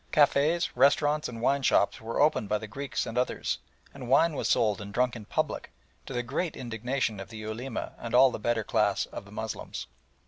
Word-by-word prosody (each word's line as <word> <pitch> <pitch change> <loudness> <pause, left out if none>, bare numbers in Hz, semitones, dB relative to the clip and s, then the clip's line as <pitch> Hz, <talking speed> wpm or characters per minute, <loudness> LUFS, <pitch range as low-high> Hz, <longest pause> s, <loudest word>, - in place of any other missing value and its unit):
Cafés, 150 +3 +3
restaurants, 145 +3 +3
and 115 -2 -7
wine 140 +2 +3
shops 100 - +2
were 115 +1 -3
opened 145 -9 +3
by 105 - +2
the 110 - -7
Greeks 135 +7 -3
and 115 +2 -2
others, 125 - -1 0.3
and 130 -3 -8
wine 160 +5 +5
was - - -1
sold 105 -2 +2
and 100 0 -7
drunk 125 +3 +1
in 110 -3 -8
public, - - -2 0.4
to - - -6
the 120 0 -1
great 145 +7 -2
indignation 120 -2 -2
of 100 - -8
the 115 - -9
Ulema 110 +4 -5
and 120 0 -3
all 130 +1 +7
the - - -5
better 115 0 0
class - - +1
of - - -9
the - - -15
Moslems. - - -5
125 Hz, 205 wpm, -28 LUFS, 110-140 Hz, 0.4 s, all